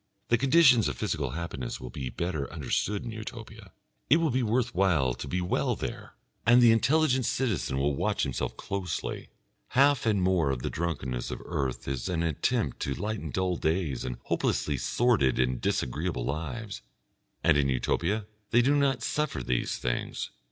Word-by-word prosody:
The 120 - +4
conditions 135 - +6
of 70 -4 -3
physical 70 -3 -1
happiness 75 -8 -4
will 65 -1 -8
be 65 0 -4
better 75 +2 -3
understood 105 -1 -1
in 115 - -5
Utopia, 110 -2 -9 0.4
it 150 - +7
will 165 -3 +1
be 130 +2 +1
worth 120 +1 0
while 85 -9 +2
to - - -7
be 90 - -1
well 90 - 0
there, - - -6 0.3
and 120 +1 +6
the 120 -2 +7
intelligent 130 +3 +3
citizen 105 - -1
will 70 +1 +1
watch - - 0
himself - - -2
closely. 95 -4 -4 0.5
Half 140 -3 +4
and 105 -3 +3
more 90 -5 +2
of 65 -3 -2
the - - -2
drunkenness 65 -7 -3
of - - -5
earth 65 -3 -3
is 65 -3 -3
an 85 -2 0
attempt 85 - 0
to 70 - -2
lighten 110 +1 -3
dull 95 -2 0
days 80 -5 -1
and 60 -1 -4
hopelessly 75 -2 0
sordid 105 - +2
and 65 -1 +1
disagreeable 75 +1 -1
lives, 95 - -4 0.6
and 80 -3 +5
in 70 -2 +2
Utopia 85 - 0 0.2
they 120 +2 +4
do 140 +4 +3
not 135 -4 +2
suffer 150 +2 -1
these 60 -1 -1
things. - - -3
90 Hz, 170 wpm, -28 LUFS, -, 0.6 s, it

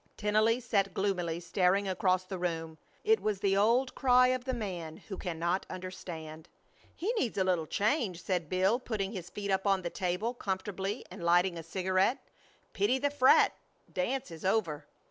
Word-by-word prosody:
Tennelly 215 +3 +2
sat 205 -5 0
gloomily 180 -4 -1
staring 180 +3 +1
across 185 0 +1
the 185 0 -6
room. 165 -2 -3 0.2
It 445 0 +4
was 210 -3 -1
the 195 -1 +2
old 235 +6 +3
cry 250 -1 +5
of 255 -1 -1
the 260 - -1
man 175 -8 -5
who 195 - -8
cannot 175 0 -1
understand. 165 -4 -7 0.5
"He 410 +8 -1
needs 235 - -1
a 190 - +3
little 180 -4 0
change," 205 - 0
said 180 -5 -1
Bill, 190 +6 +2
putting 210 -6 -3
his 180 -5 -6
feet 200 -1 -4
up 190 +1 +1
on 195 -2 +2
the 170 - -3
table 185 +6 -1
comfortably 195 0 -3
and - - -8
lighting 175 +1 +3
a 165 - -5
cigarette. 185 - +1 0.6
"Pity 395 -10 +2
the 285 +2 0
frat. 265 -2 +5 0.4
dance 250 +5 -2
is 160 -1 -9
over. 170 -7 0
190 Hz, 170 wpm, -31 LUFS, 175-220 Hz, 0.6 s, cry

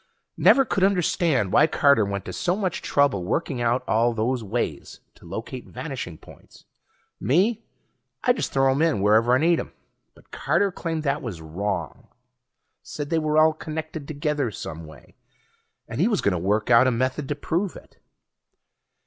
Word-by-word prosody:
Never 270 - +5
could 195 - -1
understand 170 - +1
why - - +6
Carter 140 -7 +4
went 100 -1 -4
to - - -6
so 180 -2 0
much 190 -4 -2
trouble 140 -10 +1
working 130 - -2
out 120 +2 +1
all 115 +1 +2
those 120 +2 -1
ways 105 -8 -4
to - - -17
locate 120 +3 -7
vanishing 130 - -6
points. - - -17 0.5
Me, 205 - +1 0.6
I 245 - +4
just 245 - -3
throw 135 0 +3
'em 135 +3 0
in 160 -12 +2
wherever 110 +4 +4
I - - +4
need 165 +4 +3
'em. - - -7 0.4
But - - -23
Carter 200 -1 +1
claimed 165 -3 -4
that 145 0 -1
was 105 -9 -6
wrong. 85 +2 -4 0.7
Said 145 - -7
they 165 - +2
were 155 -1 0
all 155 0 +5
connected 155 -1 -6
together 150 -3 -1
some 80 -5 -8
way, 80 -3 -16 0.7
and 115 +5 -3
he 195 - +4
was 215 -4 0
gonna 90 -3 +1
work 105 +6 0
out 120 +2 +6
a - - +3
method 130 +4 -1
to 145 - -2
prove 170 +6 -2
it. - - -15
135 Hz, 170 wpm, -24 LUFS, 110-160 Hz, 0.7 s, why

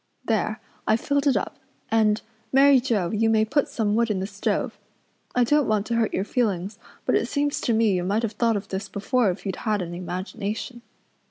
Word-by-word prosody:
There, 215 -1 0 0.3
I've 220 +1 +3
filled 285 +2 0
it 265 -6 +4
up, - - -4 0.3
and, 220 -1 +3 0.3
Mary 275 0 +6
Joe, 215 -9 0
you 225 +1 +2
may 220 -1 +3
put 285 +6 +1
some 220 -7 -1
wood 230 +1 +2
in 205 -3 0
the 190 - -2
stove. 200 0 -2 0.6
I 250 - +4
don't 295 +4 +3
want 215 -1 +1
to 235 - -3
hurt 230 -2 +1
your - - 0
feelings 205 -4 -1 0.3
but - - +1
it - - +2
seems 290 0 -1
to 235 - +1
me 220 -1 +3
you 180 -1 0
might 205 +5 0
have 225 - 0
thought 225 0 +1
of 200 0 -7
this 195 +1 -4
before 220 +2 +1
if 180 +3 -4
you'd 190 -2 -3
any 180 -5 -1
imagination. 200 +6 -5
220 Hz, 205 wpm, -25 LUFS, 200-240 Hz, 0.6 s, Mary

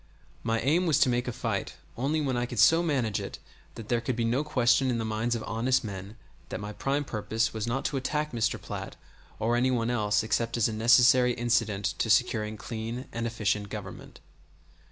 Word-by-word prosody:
My 115 0 0
aim 165 +8 +2
was 155 - +3
to - - +5
make 120 0 0
a - - -1
fight 115 -4 -3 0.2
only 145 +6 0
when 135 -3 -1
I 120 0 -1
could 120 - -7
so 165 +10 +6
manage 130 -11 0
it - - -6 0.4
that 110 - -8
there 120 0 +1
could 120 +1 -2
be 115 -1 0
no 125 +6 +1
question 130 -3 +2
in 120 - 0
the 115 - -2
minds 110 +2 -1
of 115 - -4
honest 125 +4 0
men 100 0 -7 0.3
that - - -4
my 105 +1 -6
prime 140 +6 -1
purpose 115 0 -1
was 110 0 -3
not 125 +3 -2
to 140 - -1
attack 150 +3 -2
Mr. 115 -2 0
Platt - - -7 0.4
or 115 +2 +1
any 125 +2 +2
one 120 -2 0
else 105 -3 +1
except 115 +2 -1
as 115 - +3
a 110 - -3
necessary 120 +2 +5
incident 115 -4 0
to 115 - 0
securing 110 -2 +2
clean 115 +3 -5
and 115 0 -2
efficient 105 -2 -1
government. 105 -2 -9
120 Hz, 205 wpm, -28 LUFS, 110-125 Hz, 0.4 s, so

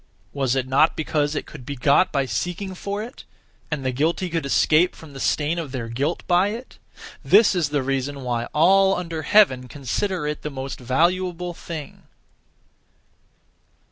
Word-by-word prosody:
Was 135 -2 0
it 130 -1 -1
not 135 +5 +3
because 150 -1 0
it - - -3
could 145 -5 -11
be 140 +3 -5
got 140 +7 +3
by 140 -1 0
seeking 180 - -3
for 200 +3 -4
it, 245 +5 -10 0.5
and 150 -4 -3
the 130 - +1
guilty 160 +7 -1
could 160 -4 -2
escape 155 +5 +3
(from 155 -3 -13
the 135 - -8
stain 155 +5 0
of 155 -5 -5
their 120 -4 -4
guilt) 140 +8 -2
by 180 +2 +3
it? 230 +5 -7 0.4
This 225 - +5
is 170 -6 0
the 145 -2 0
reason 135 +1 -2
why 120 -1 -1
all 190 +7 +4
under 165 -3 -4
heaven 150 -8 +4
consider 150 - -2
it 150 0 -3
the 150 - -4
most 135 -1 -6
valuable 175 +7 0
thing. 160 -4 -9
150 Hz, 170 wpm, -23 LUFS, 135-180 Hz, 0.5 s, This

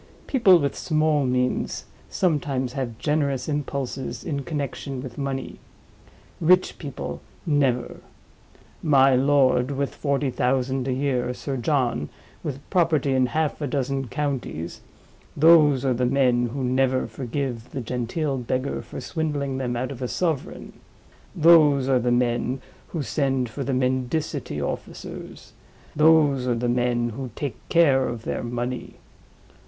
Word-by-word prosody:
People 210 -9 +5
with 140 -4 -1
small 155 -3 +1
means 125 0 -1 0.2
sometimes 140 -7 0
have 125 -5 -4
generous 145 -2 0
impulses 140 -3 -3
in 140 -3 -2
connection 140 -2 -4
with 125 -2 -7
money—rich 155 +5 -2
people, 75 - -6 0.2
never. 135 -6 +1 0.8
My 135 -3 +5
lord, 130 -1 +3
with 140 0 -2
forty 140 -2 -1
thousand 130 +1 0
a - - 0
year; 125 -2 -1
Sir 135 +1 -4
John, 120 - 0 0.3
with 140 -1 -5
property 160 -7 +2
in 130 -1 +3
half 155 +4 -1
a 145 - -1
dozen 135 0 -1
counties—those 145 - +1
are 130 - +3
the 125 +1 +1
men 125 -2 +2
who 130 +3 -4
never 130 +1 +1
forgive 125 -2 -4
the 135 - -5
genteel 125 +4 -2
beggar 130 +3 -2
for - - -8
swindling 145 -5 -2
them 125 -2 -2
out 130 +3 -2
of 135 -2 -8
a 125 - -1
sovereign; 160 -1 -3 0.6
those 150 -5 +6
are 130 -2 +3
the 125 +1 0
men 120 +1 +1 0.3
who 160 -4 -3
send 135 -4 0
for 135 +5 -5
the 135 - -2
mendicity 130 - -1
officers; 70 - -6 0.4
those 150 -4 +4
are 120 - +2
the 120 +1 -1
men 120 -1 +1
who 130 +3 -6
take 140 -4 -6
care 140 -6 +4
of 115 -2 -5
their - - -3
money. 120 +1 -4
135 Hz, 135 wpm, -24 LUFS, 125-145 Hz, 0.8 s, those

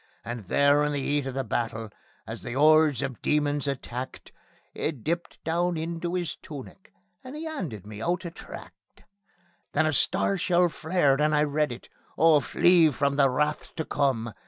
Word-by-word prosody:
And 115 -4 -6
there 145 +6 +4
in 150 0 0
the 145 - -1
'eat 145 0 -1
of 135 - -5
the 135 - -1
battle, 115 -2 -3 0.3
as - - -7
the 120 - -6
'ordes 150 -2 +5
of 135 -4 -5
demons 145 -1 +1
attacked, 130 -2 -5 0.4
He - - -1
dipped 165 +5 -4
down 170 +1 0
into 170 +2 -3
'is 175 -2 -3
tunic, 150 +6 -11 0.3
and 260 +3 -8
'e 320 - -6
'anded 170 - -5
me 105 0 -9
out 175 +7 -1
a 170 - -5
tract. - - -13 0.7
Then 155 +2 +3
a 155 - +1
star 190 +5 +2
shell 175 0 +3
flared, 155 -2 +1
and 150 0 +3
I 150 - +4
read 150 0 0
it: 120 - -9 0.3
Oh, 160 -1 +6
Flee 170 +2 +4
From 140 0 0
the 140 -1 +4
Wrath 150 +4 -1
to 160 - -3
Come! 120 -6 0
150 Hz, 180 wpm, -27 LUFS, 135-165 Hz, 0.7 s, Oh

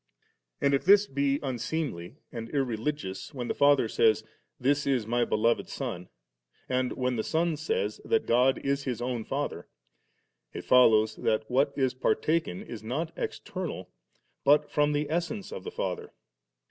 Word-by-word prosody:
And 140 - +2
if 135 - +2
this 200 +2 +6
be 140 -2 0
unseemly 125 - -3 0.2
and 115 -2 -6
irreligious, 135 -2 -3
when 125 -2 -4
the - - 0
Father 140 -4 +4
says, 110 -1 +3 0.4
'This 140 +2 +1
b 130 -5 +1
My 120 +2 +1
Beloved 115 +2 +1
SonV 90 0 -5 0.6
and 130 -1 0
when 125 -1 -1
the 110 - 0
Son 165 0 0
says 450 - -2
that 450 -1 +1
God 130 +2 +3
is 140 0 0
His 125 -4 -2
own 120 -2 -2
Father, - - -3 0.9
it - - -6
follows 110 -3 +5
that 110 -1 0
what 140 +3 +3
is 130 -3 +1
partaken 150 - 0
is 115 -3 -8
not 150 +9 -3
external, 175 - -5 0.5
but 145 +1 +4
from 150 0 +2
the 145 0 0
essence 175 +6 -3
of 95 - -6
the - - -5
Father. - - -4
130 Hz, 155 wpm, -28 LUFS, 115-150 Hz, 0.9 s, this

